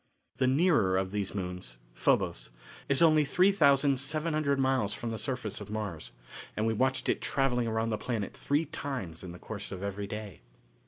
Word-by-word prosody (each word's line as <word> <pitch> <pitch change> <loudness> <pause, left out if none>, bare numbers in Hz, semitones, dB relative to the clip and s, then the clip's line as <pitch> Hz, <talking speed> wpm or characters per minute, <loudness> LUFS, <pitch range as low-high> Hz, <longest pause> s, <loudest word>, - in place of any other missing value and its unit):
The 130 0 +2
nearer 130 - +3
of 95 0 -1
these 105 -1 -2
moons, 90 -10 -4 0.2
Phobos, - - +1 0.4
is 140 +4 +4
only 155 -2 +6
3,700 145 -2 +3
miles 130 -6 +1
from 115 - -4
the 110 - -4
surface 120 -3 -3
of - - -8
Mars, 105 -7 -4 0.5
and 110 - +1
we 115 - +2
watched 130 +3 0
it - - +1
travelling 125 -2 +1
around 110 0 0
the 110 - -1
planet 115 -6 -3
three 145 +3 0
times 125 - -5
in 90 - -7
the 90 - -9
course 100 +2 -7
of 95 -1 -6
every 100 0 -3
day. 105 - -7
115 Hz, 170 wpm, -30 LUFS, 100-140 Hz, 0.5 s, only